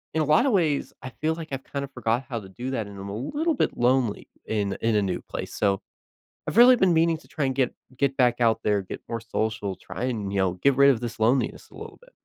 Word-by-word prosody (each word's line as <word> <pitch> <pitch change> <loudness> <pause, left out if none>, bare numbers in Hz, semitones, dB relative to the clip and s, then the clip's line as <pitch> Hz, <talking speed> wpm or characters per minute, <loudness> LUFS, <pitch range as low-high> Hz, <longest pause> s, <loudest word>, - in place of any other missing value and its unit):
in 160 - +2
a - - +1
lotta 235 - +4
ways, 160 -8 +1
I 130 - -5
feel 160 +1 +1
like 165 -1 -8
I've 135 0 -4
kind 140 -1 -5
of 140 - -16
forgot 120 +1 -1
how 120 -3 -3
to 95 -3 -12
do 120 +7 -5
that, 115 -6 -2
and 100 -1 -10
I'm 100 +1 -7
a 100 - -5
little 295 - -1
bit 270 - -1
lonely 125 -3 +1 0.2
in 100 -3 -1
in 115 -1 +1
a 105 - +3
new 95 -2 -2
place, - - -7
so 100 -2 +1 0.7
I've - - -3
really 245 +2 +8
been 190 -6 +3
meaning 165 0 +3
to - - -20
try 150 - -2
and 130 - -1
get 130 -2 +1 0.2
get 140 0 0
back 125 -2 +2
out 115 -2 +3
there, 105 -2 +2
get 95 - -8
more 115 0 -3
social, 110 -3 -2
try 90 +5 -7
and, 110 -6 -2
you 100 - -1
know, 95 -2 +2
get 130 +9 +2
rid 140 +1 +7
of 125 -5 +1
this 120 -2 -6
loneliness 125 +4 +1
a - - -19
little - - -9
bit. - - -19
125 Hz, 265 wpm, -25 LUFS, 105-145 Hz, 0.7 s, really